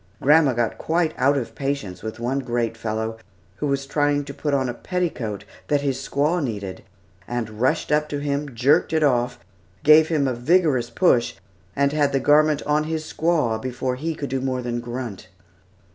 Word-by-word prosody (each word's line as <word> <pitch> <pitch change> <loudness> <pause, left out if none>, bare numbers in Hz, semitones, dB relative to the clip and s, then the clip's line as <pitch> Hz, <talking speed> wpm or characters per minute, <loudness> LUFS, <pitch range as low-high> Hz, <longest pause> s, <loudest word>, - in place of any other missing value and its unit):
Grandma 150 -1 +5
got 120 -1 -1
quite 165 0 0
out 140 +3 +2
of 115 -4 -4
patience 125 -9 -3
with 110 +1 -6
one 125 +3 -1
great 120 -3 -2
fellow 110 0 -3 0.4
who 150 - -2
was 140 0 -1
trying 145 0 +1
to 140 - -7
put 145 +1 -3
on 135 -2 +1
a 120 - -2
petticoat 130 - -3 0.2
that 145 -1 +2
his 135 -2 -1
squaw 150 +5 0
needed, 100 -7 -4 0.5
and 115 -2 -4
rushed 130 - +1
up 150 0 +2
to 145 - -2
him, 140 -2 -3
jerked 135 +7 +3
it 160 -1 +2
off, 125 -3 +2 0.5
gave 155 +1 +7
him 150 -4 +1
a 130 - 0
vigorous 130 -2 +2
push, 120 -10 +2 0.4
and 140 +1 +2
had 145 -2 +1
the 135 - +2
garment 150 +2 +3
on 150 +1 +1
his 160 0 -2
squaw, 155 -11 0
before 130 0 -2
he 160 +5 -3
could 140 -3 -5
do 135 -1 -1
more 130 -1 -2
than 120 0 -2
grunt. 120 -5 -6
135 Hz, 185 wpm, -23 LUFS, 120-150 Hz, 0.5 s, gave